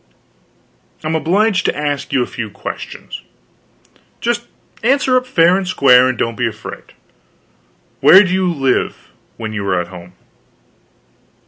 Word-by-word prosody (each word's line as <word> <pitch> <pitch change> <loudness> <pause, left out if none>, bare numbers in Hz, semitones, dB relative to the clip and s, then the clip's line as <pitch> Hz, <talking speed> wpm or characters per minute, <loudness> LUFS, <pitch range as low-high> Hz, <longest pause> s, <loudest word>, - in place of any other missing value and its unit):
I'm 155 +1 -2
obliged 185 +6 +1
to - - -1
ask 145 -2 -3
you 130 - +2
a - - -3
few 115 -3 -6
questions; - - -8 1.0
just 240 0 -2 0.3
answer 260 +2 +2
up 255 0 +1
fair 175 -6 +4
and 190 -1 -2
square, 130 -7 +5
and 130 -2 -2
don't 115 0 -2
be 120 +1 0
afraid. 110 -1 -9 1.1
Where 190 +3 +8
do 185 -2 -2
you 185 -1 +1
live, 135 -5 -1 0.3
when 110 -1 -5
you 105 -2 -3
are 90 -2 +1
at 85 0 -5
home?" 90 -1 -12
150 Hz, 140 wpm, -17 LUFS, 115-190 Hz, 1.1 s, Where